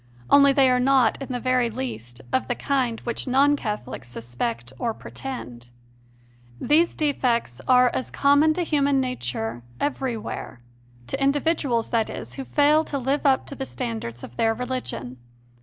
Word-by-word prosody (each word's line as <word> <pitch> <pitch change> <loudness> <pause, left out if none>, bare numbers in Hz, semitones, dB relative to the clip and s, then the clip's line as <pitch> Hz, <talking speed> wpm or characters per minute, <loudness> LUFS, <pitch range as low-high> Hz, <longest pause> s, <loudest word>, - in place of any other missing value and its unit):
Only 280 0 +7
they 275 -1 +4
are 250 - +3
not, 260 -1 +3
in 275 - -5
the 245 - -2
very 255 -1 +1
least, 130 - -6
of 260 - +1
the 245 - -1
kind 255 -5 -1
which 235 +2 -4
non 275 +3 +4
Catholics 210 - -5
suspect 120 0 -4
or 230 -2 -1
pretend. 125 - -8 0.9
These 325 +4 +3
defects 245 - +1
are 250 -1 +6
such - - +1
as 255 - -7
are - - -21
common 285 +3 +4
to 355 - 0
human 285 -4 +2
nature 120 - -3 0.2
everywhere 250 - -3 0.5
to 270 - -4
individuals, 275 -4 +1
that 225 -2 +1
is, - - -7
who 270 - -5
fail 300 +3 +4
to 280 - -3
live 275 +3 0
up 265 -1 +3
to - - -8
the 270 -1 -5
standards 225 - -5
of 120 - -10
their 225 0 +2
religion. 245 - -4
255 Hz, 165 wpm, -24 LUFS, 220-280 Hz, 0.9 s, Only